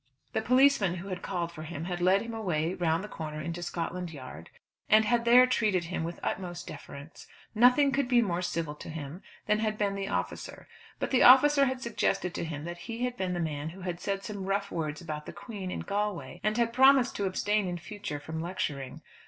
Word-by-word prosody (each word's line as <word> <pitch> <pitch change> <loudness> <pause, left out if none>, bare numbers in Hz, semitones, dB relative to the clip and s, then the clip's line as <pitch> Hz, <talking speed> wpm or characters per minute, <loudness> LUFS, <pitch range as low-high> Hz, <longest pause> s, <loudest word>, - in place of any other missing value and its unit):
The - - +1
policeman 250 -6 +4
who 185 +3 -7
had 185 -1 -4
called 175 -3 -3
for 165 -2 -9
him 155 0 -6
had 175 -1 -3
led 190 +3 +4
him 230 0 -6
away 175 -6 -1
round 170 -1 0
the - - -5
corner 155 -6 -6
into 170 +3 -4
Scotland 175 +1 -3
Yard, 130 - -10 0.4
and 215 0 +6
had 235 +1 +2
there 245 +2 +8
treated 215 -8 +1
him 160 - -1
with 170 +1 -4
the - - -10
utmost 175 -2 -3
deference. 140 +4 -10 0.3
Nothing 250 +5 +5
could 275 -1 +1
be 245 -1 +4
more 180 -6 0
civil 165 -4 -2
to 150 - -10
him 155 +2 -7 0.2
than 210 0 +2
had 215 -1 -1
been 205 -2 0
the 195 0 -3
officer. - - -4 0.3
But - - -3
the 260 - +4
officer 280 +3 +7
had 260 -1 -2
suggested 195 -5 0
to - - -3
him 155 -3 -5
that 175 +1 -6
he 230 +2 -2
had 250 0 -3
been 185 -5 -2
the - - -2
man 155 -2 -3
who 185 +4 -11
had 180 -2 -4
said 195 +1 -2
some 200 -2 -5
rough 200 +1 -1
words 155 -3 -3
about 150 -3 -6
the - - -7
Queen, 200 -2 -7
in - - -4
Galway, 205 -2 -3
and 215 +1 +1
had 230 -1 +1
promised 265 0 +5
to 200 - -1
abstain 205 +1 0
in 175 -1 -3
future 175 -3 -6
from 160 +2 -5
lecturing. 145 -6 -4
190 Hz, 220 wpm, -29 LUFS, 165-220 Hz, 0.4 s, there